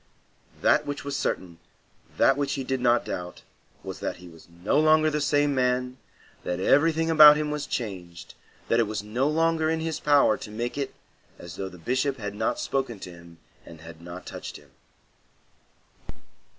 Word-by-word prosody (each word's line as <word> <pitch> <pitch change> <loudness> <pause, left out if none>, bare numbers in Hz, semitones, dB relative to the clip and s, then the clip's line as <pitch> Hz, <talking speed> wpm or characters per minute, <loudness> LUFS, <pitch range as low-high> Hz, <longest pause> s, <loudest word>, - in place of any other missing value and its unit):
That 150 -1 +3
which 145 0 -4
was 140 -1 -4
certain, 85 -3 -3 0.6
that - - +4
which 140 -1 -1
he 135 - -3
did 130 0 -2
not 120 -1 +3
doubt, 90 0 -6 0.4
was - - -7
that - - -3
he 90 - -13
was 80 -1 -16 0.2
no 125 +9 +2
longer 155 0 +4
the 150 0 -1
same 145 0 +2
man, 125 0 0 0.5
that 90 0 -3
everything 160 - +3
about 150 -2 +9
him 150 0 -2
was 150 -1 -4
changed, 90 -7 -6 0.3
that 115 - +2
it 115 - +2
was 105 -1 -4
no 120 +6 -1
longer 160 0 +1
in 160 0 0
his 160 -1 -3
power 145 -2 +4
to 130 -5 -9
make 120 +3 -4
it 140 -2 -4 0.4
as 85 -2 -10
though 95 -1 -5
the 90 - -13
Bishop 130 - -1
had 105 -3 -5
not 110 +2 -1
spoken 130 -6 -2
to 90 - -8
him 85 -1 -15 0.3
and 80 -1 -13
had 80 0 -12
not 85 +1 -9
touched - - -8
him. 75 -2 -20
125 Hz, 180 wpm, -26 LUFS, 95-145 Hz, 0.6 s, about